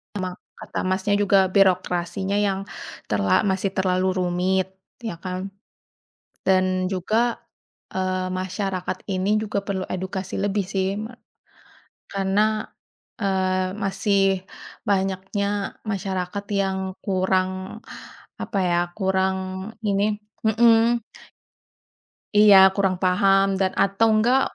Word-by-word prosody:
Sama 185 -2 -3 0.2
kata - - -6
Masnya 190 +2 +1
juga, 195 -2 +4
birokrasinya 185 0 +1
yang 200 -1 0 0.4
terla 100 -2 +2
masih 190 0 -1
terlalu 185 -1 +1
rumit. 180 +1 +1 0.3
Ya 225 -7 -5
kan? 185 +2 -5 0.9
Dan 185 -1 +2
juga, 220 +6 0 0.6
eee, 185 0 -1
masyarakat 185 0 -3
ini 195 +2 +1
juga 215 -2 -2
perlu 195 -2 -3
edukasi 190 +1 -4
lebih, 200 -1 0
sih. 195 +1 -1
Me 220 +3 -6 1.0
karena, 210 +3 +1 0.5
eee, 185 -2 0
masih 200 0 +1 0.7
banyaknya 195 +1 -1
masyarakat 195 -1 -3 0.2
yang 190 -1 -1 0.3
kurang, 185 -1 +1 0.9
apa 200 - -2
ya, 175 -1 +2 0.2
kurang 190 0 -1
ini 205 +1 +1 0.3
mhm. 230 +1 +4 1.4
Iya. 210 -1 +8 0.2
Kurang 195 -2 +1
paham 195 +1 +3
dan 190 -1 +2
atau 200 +3 +3
enggak, 245 +5 +4
190 Hz, 100 wpm, -23 LUFS, 185-200 Hz, 1.4 s, Iya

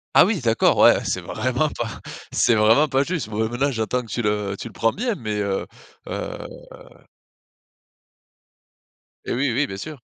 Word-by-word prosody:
Ah - - +8
oui 200 -6 0
d'accord, 115 -2 +3
ouais, - - +6
c'est - - -1
vraiment 130 +6 -1
pas 120 -4 -5 0.3
c'est 120 - +3
vraiment 110 +8 +5
pas 135 0 +2
juste. 165 -8 -3
Bon 110 +1 -1
et - - -3
maintenant 135 +4 0
j'entends 115 +1 -1
que 120 - -13
tu 120 +1 -3
le 105 -1 -1
tu - - -6
le 110 - -12
prends 115 - +1
bien 235 +2 -2
mais, 110 - -4
heu 100 -1 -2 0.4
heu - - -4 2.9
Et - - -2
oui, 130 +2 +1
oui, 140 +3 +1
bien 95 - -6
sûr. 145 +6 -7
120 Hz, 180 wpm, -22 LUFS, 110-140 Hz, 2.9 s, Ah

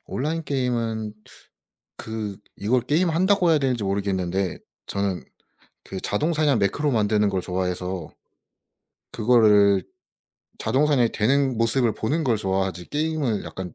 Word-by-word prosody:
온라인 160 +5 -2
게임은 115 -6 -2 0.8
그 110 -3 -5 0.2
이걸 120 +5 +1
게임한다고 175 - +2
해야 155 - +4
되는지 125 -6 0
모르겠는데 95 -1 -1 0.3
저는 100 -2 -2 0.6
그 95 - -6
자동 150 +11 0
사냥 150 -5 +2
매크로 145 +9 +1
만드는 105 -2 +2
걸 95 -2 -1
좋아해서 90 -1 -3 1.0
그거를 105 -4 +4 0.8
자동 145 +3 +1
사냥이 125 -6 +3
되는 130 +3 +2
모습을 115 0 +2
보는 150 +10 -1
걸 120 -4 +2
좋아하지 95 -3 -2
게임을 150 -7 -1
약간 90 -2 -7
110 Hz, 295 characters per minute, -24 LUFS, 100-140 Hz, 1.0 s, 해야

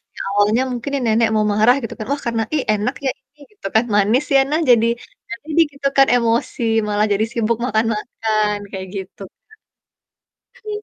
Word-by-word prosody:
yang - - -6
awalnya 205 +4 +2
mungkin 245 +3 -4
nih 275 - -1
nenek 225 0 +3
mau 215 0 +2
marah 220 +5 +4
gitu 230 - -5
kan. 215 - -4
Wah, 285 - -1
karena 230 -1 0
"Ih, 280 - 0
enak 215 +5 -2
ya - - +2
ini," 295 +2 -41
gitu 410 - -8
kan, 220 - +5
"manis 215 +7 +3
ya?" - - +7
Nah, 310 - +2
jadi 230 -1 +5 0.4
nggak 230 0 -7
jadi 320 +1 +3
gitu 280 0 -2
kan 275 - +6
emosi, 235 0 0 0.2
malah 210 +1 +1
jadi 215 +2 +1
sibuk 230 -1 0
makan-makan 215 -1 -1
kayak 190 -1 -6
gitu, 195 +1 -8 1.4
Kak. 425 0 -5
230 Hz, 185 wpm, -19 LUFS, 215-255 Hz, 1.4 s, ya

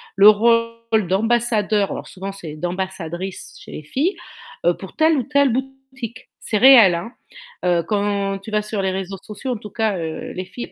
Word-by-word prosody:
le 200 +2 +9
rôle 230 -1 +2
d'ambassadeur, 215 0 +1
alors - - -6
souvent 195 +1 -6
c'est 165 -6 -8
d'ambassadrice 180 +1 -5
chez - - -12
les 155 - -7
filles, 290 - -1 0.5
heu, 175 0 +4
pour 190 - -11
telle 315 0 +3
ou 260 - 0
telle 280 +1 +3
boutique, 265 -2 -6
c'est 215 - -1
réel, 230 -7 +8
hein. 170 +7 -5 0.5
Heu, 175 -1 +2
quand 200 -1 -1
tu 195 +3 -10
vas 210 0 +1
sur 210 -1 -3
les 190 - 0
réseaux 190 +1 -4
sociaux 215 +5 -6
en 245 - -2
tout 210 0 -10
cas, 215 -2 0
heu, 160 -2 -5
les 185 - -5
filles 240 +6 -8
210 Hz, 185 wpm, -21 LUFS, 190-235 Hz, 0.5 s, le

